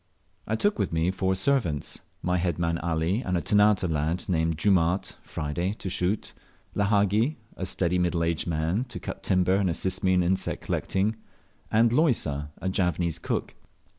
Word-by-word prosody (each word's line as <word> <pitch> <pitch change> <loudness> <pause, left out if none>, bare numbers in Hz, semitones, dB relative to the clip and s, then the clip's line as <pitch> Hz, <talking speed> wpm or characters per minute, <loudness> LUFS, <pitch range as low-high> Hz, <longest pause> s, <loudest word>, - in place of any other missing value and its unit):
I 110 - 0
took 205 - +1
with - - 0
me 85 +2 +1
four 95 0 0
servants: 95 - 0 0.2
my 90 0 +1
head 85 -2 0
man 85 -1 0
Ali, 85 +6 0
and 90 -6 -1
a - - +1
Ternate 105 +2 +4
lad 80 +2 -1
named 80 -3 +1
Jumaat 90 0 +2
(Friday), 85 +6 -3
to 95 -3 -6
shoot; 90 +5 -1 0.4
Lahagi, 105 +6 +2 0.2
a 95 - -4
steady 90 -1 +1
middle 85 -1 +1
aged 85 0 -1
man, 85 +8 0
to 120 - -7
cut - - -6
timber 90 0 +2
and 95 -1 +2
assist 95 +2 -2
me 95 0 +4
in 90 - +3
insect 95 +2 -1
collecting; 100 +4 0 0.5
and 115 +1 +4
Loisa, 80 - +1
a - - -4
Javanese 90 -3 0
cook. - - -2
90 Hz, 165 wpm, -27 LUFS, 85-100 Hz, 0.5 s, Ternate